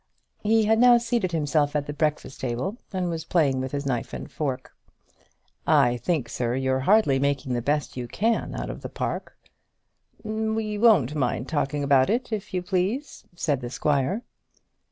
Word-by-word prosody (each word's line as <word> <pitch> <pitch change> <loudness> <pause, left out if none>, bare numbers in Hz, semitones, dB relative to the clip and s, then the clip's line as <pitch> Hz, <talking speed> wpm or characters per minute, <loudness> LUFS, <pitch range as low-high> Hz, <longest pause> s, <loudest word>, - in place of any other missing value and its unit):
He 220 +1 +3
had 220 +1 +3
now 245 0 +7
seated 235 -5 -1
himself 150 -2 +1
at 145 -1 0
the 145 - -5
breakfast 150 -2 -2
table, 130 - -2
and 185 -2 -1
was 165 -2 -3
playing 150 -6 +2
with 130 0 -4
his 140 0 -3
knife 125 -4 -2
and - - -7
fork. 135 -4 -4 0.9
"I 135 -6 +4
think, 150 -3 -1
sir, 120 0 -2
you're 130 0 0
hardly 200 -11 +5
making 140 -1 0
the 120 - 0
best 145 +4 -1
you 125 -1 -4
can 225 - 0
out - - -4
of - - -9
the - - -6
park." - - -4 0.9
"We 220 -1 -2
won't 205 - +5
mind 130 -3 -1
talking 145 -2 -1
about 135 -2 +4
it, 235 +1 -1
if 210 -1 -4
you 180 -1 -2
please," 195 +10 -2
said 145 -6 0
the 120 - -5
squire. 150 - 0
150 Hz, 175 wpm, -25 LUFS, 135-210 Hz, 0.9 s, now